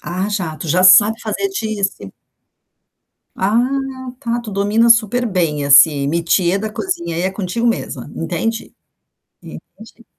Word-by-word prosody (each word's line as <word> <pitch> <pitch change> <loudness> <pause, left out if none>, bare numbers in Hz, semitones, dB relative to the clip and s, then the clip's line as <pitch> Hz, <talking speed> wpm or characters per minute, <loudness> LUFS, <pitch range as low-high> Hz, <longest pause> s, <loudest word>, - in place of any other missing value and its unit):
Ah, 185 +3 -4
já, 175 -7 -3
tu 165 - -7
já 180 +5 +2
sabe 205 +4 +6
fazer 225 - -3
dissi 205 - -4 1.2
Ah, 200 +4 0 0.6
tá, 235 -3 -2
tu 225 - -8
domina 205 +4 +1
super 230 +2 +3
bem 165 -8 -1
assim, 140 0 +5
métier 170 +4 +1
da 215 +1 -4
cozinha, 210 - -4
aí, 170 - -2
é 190 - 0
contigo 195 +4 -3
mesma, 230 - -3
entendi, 225 0 -4 0.7
entendi. 230 +1 -14
200 Hz, 135 wpm, -17 LUFS, 170-225 Hz, 1.2 s, sabe